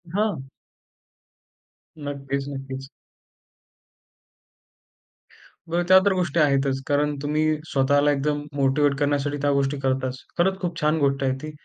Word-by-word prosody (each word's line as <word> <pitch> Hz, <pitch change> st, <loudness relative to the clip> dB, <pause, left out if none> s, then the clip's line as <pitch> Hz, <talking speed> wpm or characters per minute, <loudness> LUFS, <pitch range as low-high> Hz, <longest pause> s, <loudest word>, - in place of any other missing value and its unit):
हां. 200 Hz, -11 st, -1 dB, 1.5 s
नक्कीच, 140 Hz, -2 st, -4 dB
नक्कीच. 135 Hz, -1 st, -7 dB, 2.8 s
बरं 170 Hz, +1 st, +1 dB
त्या 185 Hz, -, +8 dB
तर 200 Hz, -, +4 dB
गोष्टी 175 Hz, -3 st, 0 dB
आहेतच. 135 Hz, -2 st, +2 dB
कारण 145 Hz, +1 st, +1 dB
तुम्ही 150 Hz, +1 st, 0 dB, 0.3 s
स्वतःला 145 Hz, +2 st, +3 dB
एकदम 145 Hz, +1 st, -1 dB
मोटिव्हेट 140 Hz, +1 st, +2 dB
करण्यासाठी 145 Hz, 0 st, 0 dB
त्या 145 Hz, -, +2 dB
गोष्टी 140 Hz, +1 st, 0 dB
करताच. 130 Hz, -1 st, -1 dB, 0.2 s
खरंच 190 Hz, +2 st, +2 dB
खूप 170 Hz, -2 st, -3 dB
छान 150 Hz, +1 st, +2 dB
गोष्ट 140 Hz, -1 st, +1 dB
आहे 130 Hz, -, +1 dB
ती. 155 Hz, -, -6 dB
145 Hz, 120 wpm, -24 LUFS, 135-150 Hz, 2.8 s, त्या